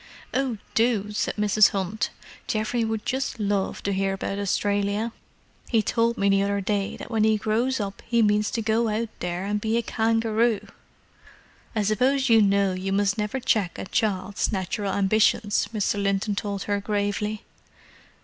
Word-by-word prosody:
"Oh, 255 -3 0 0.2
do," 220 -3 +1
said 210 - -1
Mrs. 210 0 +4
Hunt. 195 +2 -2 0.4
"Geoff 215 0 -1
would 225 -3 -1
just 265 -2 -2
love 200 -2 -1
to 200 - 0
hear 195 0 0
about 195 +1 -3
Australia. 205 +2 0 0.6
He 225 -3 +3
told 230 +1 +1
me 200 - +1
the 195 0 +4
other 200 0 0
day 200 0 -1
that - - -9
when 220 -2 +2
he 220 0 +4
grows 230 +5 0
up 200 -1 -4
he 235 -1 +3
means 210 0 +2
to 225 - -2
go 225 +2 +2
out 220 +1 -1
there 180 +1 -3
and 205 +1 -1
be 220 +1 0
a 235 - 0
kangaroo!" 225 0 +1 1.1
"I 215 - +1
suppose 260 +6 +2
you 225 -1 +6
know 200 -1 +3
you 185 +1 -3
must 200 +1 +1
never 210 +5 -1
check 215 -7 0
a - - -5
child's 200 -2 -1
natural 195 0 -2
ambitions!" 205 +1 +2
Mr. 205 -2 0
Linton 200 +1 0
told 200 -1 -3
her 205 -1 -1
gravely. 205 +1 -2
210 Hz, 170 wpm, -25 LUFS, 200-225 Hz, 1.1 s, you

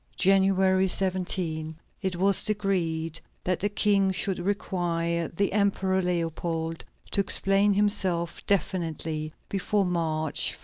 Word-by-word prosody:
January 190 0 +3
17, 180 -4 -2 0.3
it 190 -3 -2
was 195 +2 +5
decreed 170 -6 -1 0.2
that 180 -1 0
the 205 - 0
King 200 -2 +3
should 190 0 0
require 170 -3 -1
the 195 +3 -1
Emperor 195 -2 +1
Leopold 165 -2 -2 0.3
to 200 - +2
explain 195 +1 +3
himself 190 -5 0
definitely 160 -5 -1 0.2
before 200 +1 0
March 160 -3 0
1. - - -13
185 Hz, 115 wpm, -26 LUFS, 165-195 Hz, 0.3 s, was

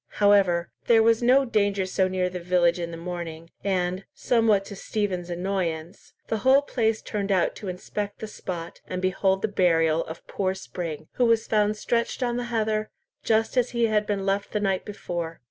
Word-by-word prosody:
However 195 -4 +3 0.2
there 225 -1 +6
was 230 0 +4
no 260 +3 +5
danger 200 -4 +1
so 185 0 +1
near 185 -1 0
the 180 0 -5
village 175 0 +2
in 170 -1 -3
the 165 - -7
morning, 165 -1 -6
and, 185 -1 0
somewhat 225 -5 +2
to 200 - -8
Stephen's 190 -3 -2
annoyance, 175 -2 -3
the 220 - -1
whole 265 +4 +5
place 225 -5 0
turned 200 -1 -2
out 185 -3 +2
to 205 - -7
inspect 200 +3 -4
the - - -6
spot, 175 -5 -7
and 185 - -3
behold 190 +1 +1
the - - +3
burial 165 -5 +2
of 160 +1 -9
poor 190 -1 -1
Spring, 165 -5 -6
who 245 - +4
was 230 -1 +3
found 210 -1 +1
stretched 235 +4 -1
on 240 -1 0
the 245 - -2
heather, 215 -2 -1 0.3
just 225 +3 +1
as 250 0 +3
he 235 - +4
had 215 -1 +1
been 200 -2 -1
left 200 +1 -1
the 210 - +1
night 195 -2 0
before. 175 -5 -5
195 Hz, 190 wpm, -25 LUFS, 180-220 Hz, 0.3 s, there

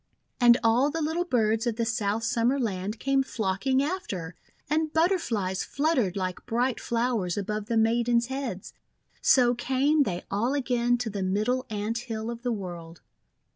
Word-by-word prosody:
And 240 -1 +7
all 235 +5 +4
the 325 +2 -3
little 325 +3 -1
birds 225 -5 +1
of 235 - 0
the 230 0 -1
South 225 -2 -1
Summer 235 +4 +1
Land 205 -2 -2
came 275 0 +2
flocking 260 +3 0
after, 195 - -4 0.3
and 310 +1 0
Butterflies 235 - 0
fluttered 275 - 0
like 185 -2 -4
bright 245 +2 0
flowers 230 -7 -1
above 210 +1 -3
the 230 - 0
Maidens' 235 +1 +2
heads. 260 -7 -5 0.5
So 245 -2 +5
came 270 +5 +1
they 180 -10 -1
all 230 +8 0
again 245 -3 +1
to 235 -2 -3
the 200 -1 -4
Middle 215 +8 0
Ant 215 +2 -2
Hill 225 -2 -4
of 235 0 -7
the 245 -1 -1
World. 175 -5 -6
235 Hz, 160 wpm, -27 LUFS, 205-260 Hz, 0.5 s, And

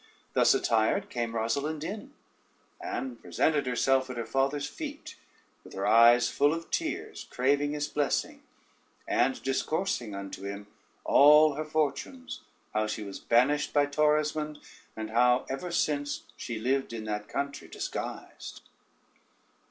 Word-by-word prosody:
Thus - - +5
attired 115 - +1
came 120 -2 -2
Rosalynde 140 +8 -1
in, 210 - -6 0.7
and 360 -9 -5
presented 145 -4 +1
herself 130 +1 +2
at 125 - -6
her 115 - -3
father's 140 +2 0
feet, 300 - -7 0.5
with - - -14
her 95 - -2
eyes 115 +1 +6
full 145 +2 +2
of 165 0 -8
tears, - - -3
craving 145 +3 +1
his 150 0 -2
blessing, 145 -1 -1 0.7
and 130 0 +1
discoursing 135 - -1
unto 100 -1 -7
him 100 +1 -6 0.4
all 150 +1 +7
her 155 +2 -4
fortunes, 155 - -2 0.3
how 110 0 +1
she 110 - -4
was 100 -1 -7
banished 140 +5 +2
by 145 -1 +4
Torismond, 150 +1 +1 0.4
and 110 0 -5
how 125 +2 +3
ever 175 +7 -4
since 145 -4 -1
she 115 - -5
lived 130 +2 -1
in 110 -1 -5
that 105 -1 -4
country 140 0 -4
disguised. - - -6
140 Hz, 135 wpm, -29 LUFS, 115-155 Hz, 0.7 s, all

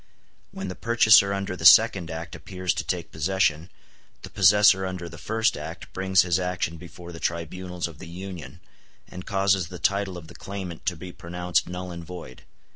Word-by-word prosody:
When 95 0 -6
the 90 - -4
purchaser 110 -2 +5
under 100 -1 -3
the - - -9
second 85 -4 +7
act 80 +1 -6
appears 90 -2 -3
to - - -3
take - - -3
possession, 80 -1 0 0.5
the - - -9
possessor 100 0 +5
under 90 -2 -4
the 80 -1 -11
first 110 +5 0
act 80 +2 -8
brings 95 -1 +3
his 90 0 +1
action 90 -2 -2
before 85 +1 -11
the 85 - -9
tribunals 85 +2 -3
of 80 -3 -13
the - - -9
Union, 85 -4 -8 0.5
and 90 0 -10
causes 95 -3 +1
the 90 +1 -9
title 100 +1 0
of 85 - -10
the 85 - -13
claimant 95 -3 -7
to 90 - +1
be 90 +2 -9
pronounced 90 0 -2
null 90 0 -6
and 85 -1 -7
void. 85 -6 -10
90 Hz, 185 wpm, -25 LUFS, 85-95 Hz, 0.5 s, second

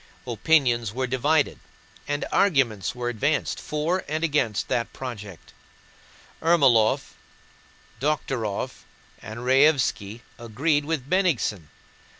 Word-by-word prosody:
Opinions 120 -3 +2
were 130 0 0
divided, 140 +4 +1 0.5
and 145 0 -2
arguments 130 - +2
were 120 0 -4
advanced 140 +6 -1
for 160 +5 -2
and 155 +2 -2
against 135 -10 0
that 115 -1 -1
project. 105 -9 -8 0.9
Ermólov, 135 -10 +3 0.9
Dokhtúrov, 130 -7 -2 0.4
and 110 +3 -8
Raévski 130 -5 +2 0.2
agreed 145 +6 0
with 150 -4 -3
Bennigsen. 145 - 0
130 Hz, 95 wpm, -25 LUFS, 115-150 Hz, 0.9 s, Ermólov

